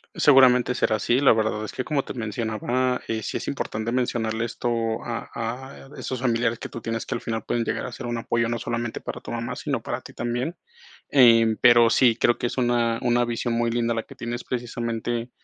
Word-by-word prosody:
Seguramente 125 -3 +5
será 110 -3 +1
así, 120 +6 +1
la 140 - +6
verdad 110 -1 +1
es 110 - -5
que 130 - -4
como 145 -3 0
te - - -7
mencionaba, 120 +3 -1
eh, 110 -1 -2
sí - - -3
es - - -6
importante 110 +2 -3
mencionarle 115 -3 -1
esto 115 -1 -2
a 115 -1 -4
a 125 +4 -6
esos 130 -2 -4
familiares 120 -2 0
que - - -5
tú 115 - -8
tienes, 115 0 -3
que - - -3
al - - -4
final 110 -2 -3
pueden 120 - 0
llegar 115 - -2
a 125 - -6
ser 120 - -6
un 120 0 -2
apoyo, 115 0 0
no 120 -1 -2
solamente 120 0 -3
para - - -7
tu - - -8
mamá, 115 0 -3
sino - - -2
para - - -4
ti - - -12
también. 120 +7 -3 0.5
Em, 115 -4 +6
pero 120 -1 +7
sí, 115 0 +4
creo 120 - +3
que 120 - -1
es - - -6
una 120 -2 +1
una 120 0 +2
visión 120 0 -2
muy 115 0 +1
linda 115 0 0
la 115 - -2
que - - -14
tienes, 120 +1 -5
precisamente 120 -1 -3
120 Hz, 220 wpm, -24 LUFS, 115-120 Hz, 0.5 s, pero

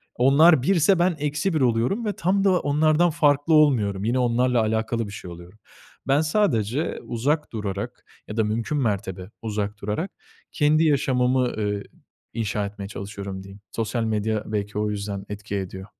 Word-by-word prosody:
onlar 140 +3 +5
1'se 175 +2 +3
ben 175 0 +2
eksi 150 +5 -1
1 155 - +1
oluyorum 125 - +1
ve 210 - -1
tam 195 +3 +1
da 185 -3 +4
onlardan 155 +4 +3
farklı 145 0 +2
olmuyorum, 115 -11 +3
yine, 120 +4 +1
onlarla 125 0 +2
alakalı 110 +1 -1
bir 100 - -8
şey 90 -3 -8
oluyorum. 85 +5 -12 0.5
Ben 140 +3 +3
sadece 150 - 0
uzak 145 +6 -1
durarak 100 -3 -5 0.2
ya 105 - -7
da 110 - +3
mümkün 115 +7 -1
mertebe 100 -6 -2
uzak 105 -1 -3
durarak 105 - -3 0.4
kendi 155 +1 +3
yaşamımı, 130 -4 +2
eee, 105 -1 -2 0.5
inşa 105 -2 -2
etmeye 100 -1 -7
çalışıyorum 100 -1 -7
diyeyim. 95 +1 -13
Sosyal 115 +1 -2
medya 110 -1 -1
belki 105 -1 -3
o 105 0 0
yüzden 100 -1 -4
etki 105 0 -5
ediyor. 95 -1 -5
115 Hz, 160 wpm, -24 LUFS, 105-150 Hz, 0.5 s, onlar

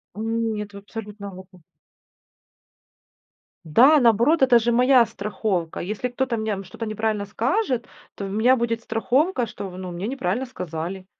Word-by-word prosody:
М, 225 +1 -1
нет 210 -1 -5
в - - -9
абсолют 210 +1 -9
навыку. 185 -2 -10 2.0
Да, 265 - +6
наоборот, 240 +7 +4
это 255 -2 +6
же 235 +1 +1
моя 250 0 +5
страховка. 200 -5 -3
Если 210 +7 -3
кто-то 250 0 -1
мне 210 -3 -2
что-то 190 +5 -7
неправильно 215 -1 -1
скажет, 245 - -1 0.3
то 200 - -5
в - - -4
у - - -6
меня 235 +5 +4
будет 230 -1 -1
страховка, 250 +5 +1
что, 200 -3 -7
ну, 185 -1 -6
мне 180 +5 -4
неправильно 245 -1 -2
сказали. 180 -2 -6
220 Hz, 150 wpm, -23 LUFS, 200-245 Hz, 2.0 s, Да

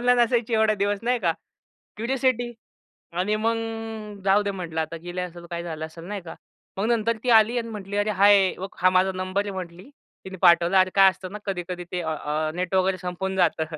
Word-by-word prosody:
Online 245 0 +3
असायची 235 -1 +1
एवढे 220 -1 +3
दिवस?" 200 0 0
नाही 245 +1 +1
का. 170 -6 +1 0.7
क्युरिओसिटी 245 0 0 0.6
आणि 190 +5 0
मग, 225 +1 0 0.7
"जाऊ 200 +1 +4
दे 205 - -2
म्हटलं 170 -4 -4
आता 160 +1 -4
गेली 175 +1 -5
असेल, 175 -1 -6
तर 170 - -11
काय 170 0 -3
झालं 160 -2 -5
असेल." 165 +1 -12
नाही 200 +2 -5
का. 165 - -9 0.4
मग 195 - -1
नंतर 230 -1 +1
ती 250 - 0
आली 235 +3 0
आणि 230 -1 -4
म्हटली, 205 -2 -6
"अरे 205 +1 +1
हाय! 200 -2 +6
बघ 190 +1 -5
हा 185 - +6
माझा 185 +1 +3
नंबर 185 +2 -1
आहे." 205 - -4
म्हटली, 180 +2 -8 0.4
तिने 190 0 -8
पाठवला. 175 +1 +6
अरे 185 0 +2
काय 195 -1 +7
असतं 185 +1 -9
ना, 210 - -5
कधी-कधी 180 -2 -4
ते 180 - -1
अ 160 -2 -2
अ 155 +1 -1
नेट 180 +1 -3
वगैरे 185 0 +2
संपून 190 +1 -4
जातं. 170 -3 +2
190 Hz, 215 wpm, -24 LUFS, 175-215 Hz, 0.7 s, काय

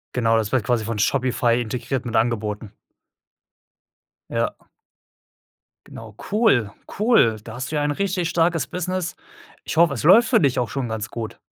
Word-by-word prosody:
Genau, 115 -2 +2
das 110 -2 -1
wird 130 -4 +1
quasi 115 -1 0
von 115 0 -3
Shopify 125 +1 +1
integriert 125 +3 -4
mit 120 -1 -4
Angeboten. 110 -2 -1 1.6
Ja. - - -1 1.3
Genau. 110 -2 -11 0.2
Cool, 200 - +3 0.3
cool. 210 - +4
Da 110 +1 -9
hast 130 +4 -5
du - - -2
ja 150 - +1
ein 145 0 0
richtig 185 +1 -1
starkes 165 -1 +1
Business. 180 0 -3 0.5
Ich - - -5
hoffe, 165 -3 +5
es 125 - -5
läuft 215 +9 +6
für 230 - +4
dich 140 -6 +1
auch 120 -2 -1
schon 135 -3 -3
ganz 110 -1 -4
gut. 115 -2 -7
125 Hz, 160 wpm, -22 LUFS, 115-170 Hz, 1.6 s, läuft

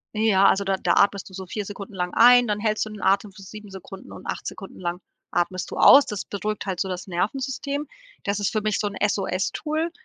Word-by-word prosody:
Ja, 215 -3 +4
also 200 - +2
da 195 0 0
da 175 -2 +1
atmest 200 0 +2
du - - -17
so 190 0 -7
4 205 +3 -5
Sekunden 200 0 -8
lang 180 -1 -3
ein, 245 +1 +7
dann 210 -1 -1
hältst 215 0 0
du - - -8
den 210 -2 -9
Atem 195 +2 +2
für 195 +1 -14
7 210 +2 -11
Sekunden 190 0 -11
und - - -11
8 - - -4
Sekunden 195 - -9
lang 175 -1 -3 0.3
atmest 175 +1 -1
du - - -7
aus. 285 - +8
Das 210 -2 -4
beruhigt 210 0 -4
halt 190 -3 -3
so 190 - -1
das 180 -1 -5
Nervensystem. 265 +9 -3 0.4
Das 200 0 -1
ist 205 - 0
für 215 - -1
mich 215 0 -1
so 210 - 0
'n 205 - -6
SOS-Tool. 300 - -2
200 Hz, 235 wpm, -24 LUFS, 190-215 Hz, 0.4 s, aus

